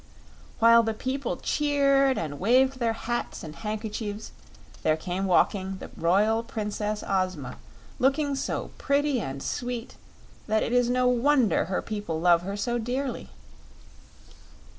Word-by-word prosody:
While 230 +1 +7
the 225 -1 -2
people 260 +3 -3
cheered 275 -2 +2
and 145 -3 -4
waved 255 +6 +3
their 230 -2 +1
hats 240 +1 -4
and 155 -1 -8
handkerchiefs, 215 -1 -5 0.5
there 155 0 +2
came 180 +4 -3
walking 190 +1 +2
the - - -10
Royal 205 +7 +2
Princess 210 -2 -3
Ozma, 185 - -1 0.4
looking 280 +2 +2
so - - -3
pretty 280 -1 +1
and 135 -3 -5
sweet 245 -1 -4 0.5
that 220 0 +2
it 235 - -2
is 245 -1 +3
no 250 0 +2
wonder 250 - +3
her 185 +2 -2
people 205 -7 -4
love 170 0 +4
her 195 +3 -5
so 240 +4 -1
dearly. 255 +3 -3
225 Hz, 135 wpm, -27 LUFS, 195-255 Hz, 0.5 s, While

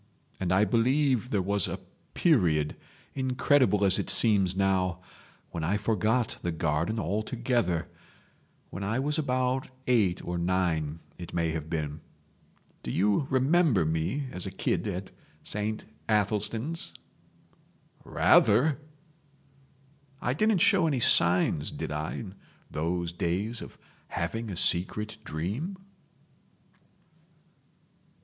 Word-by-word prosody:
And 90 -2 -1
I 95 +3 +4
believe 125 +3 +2
there 100 -6 0
was 100 -1 +1
a - - -4 0.4
period—incredible 125 - +1
as 95 -1 +5
it - - -3
seems 100 -5 +3
now—when 90 -3 -3
I 95 +6 +1
forgot 110 +3 0
the 85 - -2
garden 80 +6 -1
altogether—when 100 -4 -4
I 105 +4 -1
was 145 +4 0
about 130 -2 0 0.2
eight 105 -8 +2
or 90 0 -2
nine 85 -3 0 0.2
it 85 - -8
may 85 -1 +1
have 80 -1 -5
been. 75 -2 -3 0.8
Do - - -6
you 105 - +1
remember 135 - +3
me 80 - -1
as 90 - -4
a - - -2
kid - - -1
at 95 +2 -4 0.3
Saint 105 +1 -2 0.2
Athelstan's?" 110 +8 -1 1.1
"Rather!" 145 +2 +4 1.4
"I 120 - -1
didn't 215 +4 +2
show 195 -7 +4
any 140 -5 0
signs 85 -7 +3
did - - -5
I 75 +1 -3
in 95 -4 -7 0.4
those 85 +2 -2
days 95 +7 -2
of - - -10 0.3
having 110 +7 -3
a 95 - -5
secret 105 +6 +2
dream?" 105 - -4
100 Hz, 110 wpm, -28 LUFS, 85-125 Hz, 1.4 s, as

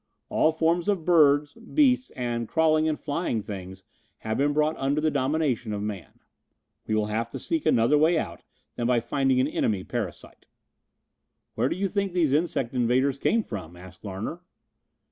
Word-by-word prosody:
All 160 - +3
forms 165 +4 +1
of 190 -6 0
birds, 150 -4 +4
beasts 255 +2 +1
and 120 -2 -2
crawling 160 +1 +2
and 155 - -2
flying 145 -6 -2
things 95 -2 -8 0.4
have 110 0 -1
been 145 +3 +2
brought 150 +1 +1
under 140 +2 0
the 155 0 +1
dominion 135 -5 0
of 105 0 -3
man. 105 -4 -6 0.7
We 110 - 0
will 105 -1 +1
have 110 +2 -2
to - - -7
seek 325 -2 -2
another 120 +6 +4
way 160 +2 +4
out 85 - -4 0.4
than 120 - -1
by 125 -1 +3
finding 130 +2 +1
an 130 - +2
enemy 105 -9 -1
parasite." 110 -7 -6 1.1
"Where - - 0
do - - -2
you 195 +2 -1
think 200 -1 -2
these 165 -6 +2
insect 145 -6 0
invaders 130 +2 +1
came 230 +8 +2
from?" 90 - -7
asked 95 +2 -14
Larner. 105 - -5
135 Hz, 170 wpm, -26 LUFS, 110-160 Hz, 1.1 s, birds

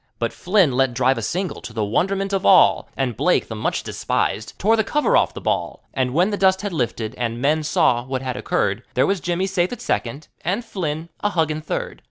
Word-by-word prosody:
But 115 -1 -2
Flynn 185 -5 +2
let 130 -1 +1
drive 130 -1 +2
a - - -4
single, 180 - -3
to 115 - -9
the 110 -2 -1
wonderment 195 - 0
of 195 0 0
all, 190 -3 +5
And 130 -4 -1
Blake, - - +1
the - - -5
much - - -2
despised, - - -2
tore 220 +4 +3
the 220 - +2
cover 295 +7 +1
off - - +2
the - - -5
ball, - - -2
And 130 -1 0
when 175 +9 +2
the 205 - -1
dust 190 -1 +3
had 205 -3 -3
lifted 120 -5 -2
and 120 -1 -2
men 150 +4 +2
saw 120 -5 +2
what 130 +1 -4
had 130 -2 -3
occurred, 100 +2 -1
There 130 - +4
was 195 -1 0
Jimmy 175 +2 -1
safe 185 -2 0
at 245 - -6
second, 140 - -3 0.2
and 200 +8 -1
Flynn 165 -6 -4
a 210 - 0
huggin' 155 -4 0
third. - - -4
160 Hz, 225 wpm, -21 LUFS, 125-195 Hz, 0.2 s, all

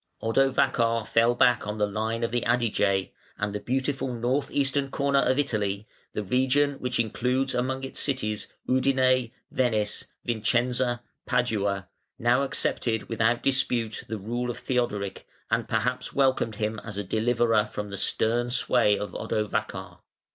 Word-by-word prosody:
Odovacar 115 -2 +2
fell 115 +2 +3
back 120 -2 +3
on 105 +1 -3
the 105 - +2
line 110 +3 -2
of 115 - 0
the 120 0 0
Adige, 110 -5 +1 0.3
and 105 -1 -2
the 105 - -2
beautiful 130 +3 -1
north 125 +4 0
eastern 140 0 +1
corner 140 0 +2
of 130 - +2
Italy, 105 -7 -1 0.3
the 105 - -2
region 130 +6 +2
which 125 -1 -2
includes 125 +4 0
among 130 +2 -1
its 135 - -5
cities 110 -7 -1 0.2
Udine, 130 -2 +3 0.2
Venice, 110 -5 0 0.2
Vicenza, 120 +1 +1 0.2
Padua, 100 -7 0 0.3
now - - +3
accepted 110 -2 -1
without 115 +1 +1
dispute 125 -4 0
the 110 - -3
rule 120 +5 -3
of 120 - -4
Theodoric, 105 -6 -2 0.2
and - - 0
perhaps 125 0 -1
welcomed 130 -5 +2
him 110 +1 -2
as 110 -3 -6
a 105 - -1
deliverer 110 +1 +2
from 105 -1 -5
the - - -4
stern 120 +4 +1
sway 120 -4 +3
of 105 - -4
Odovacar. 105 -1 -3
120 Hz, 145 wpm, -27 LUFS, 110-130 Hz, 0.3 s, fell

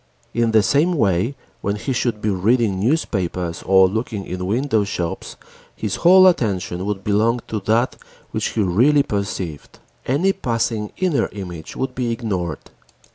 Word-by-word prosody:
In 115 -1 +2
the 110 -2 +4
same 145 - +2
way, 110 - +1 0.3
when 100 +1 -1
he 130 +6 -3
should 115 -3 -1
be 105 - +1
reading 100 +1 +1
newspapers 90 - -1
or 95 -1 +5
looking 110 0 -3
in 90 - -5
shopwindows, 100 -4 -1 0.4
his 105 -3 -3
whole 185 +2 +7
attention 100 - +1
would 100 -2 -3
belong 110 +4 +2
to 110 - -2
that 115 +3 +2 0.3
which - - -1
he 110 - +1
really 125 +11 +4
perceived. 95 - -4 0.3
Any 170 +10 +2
passing 115 - -2
inner 180 -6 +1
image 90 -5 -7
would 130 -1 -3
be 125 -2 -2
ignored. 95 - -4
105 Hz, 145 wpm, -21 LUFS, 95-125 Hz, 0.4 s, whole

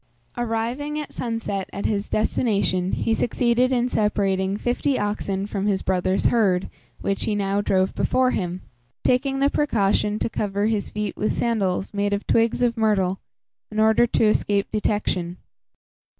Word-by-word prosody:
Arriving 240 +6 -2
at 300 - -7
sunset 225 -5 -3
at 200 - -5
his 205 -1 -1
destination, 200 -4 0
he 225 - 0
succeeded 245 +2 +1
in 245 -1 +2
separating 200 -4 0
fifty 250 +4 0
oxen 200 -2 -2
from 205 -1 -2
his 195 -2 0
brother's 185 +1 0
herd, 195 -6 +2 0.3
which 195 - -1
he 210 - 0
now 200 0 0
drove 190 -2 +1
before 255 0 +2
him, 180 -1 -3 0.4
taking 270 +2 +1
the 275 +1 +3
precaution 210 -6 +1
to - - -1
cover 205 -2 -1
his 215 -2 0
feet 210 -2 -3
with 215 - -1
sandals 200 -5 0
made 205 0 0
of 200 - -2
twigs 230 +1 +2
of 235 -1 +2
myrtle, 195 -4 +1 0.5
in 215 - -3
order 220 +2 +4
to 225 - +2
escape 205 -1 +1
detection. 185 -5 -1
210 Hz, 150 wpm, -23 LUFS, 195-235 Hz, 0.5 s, order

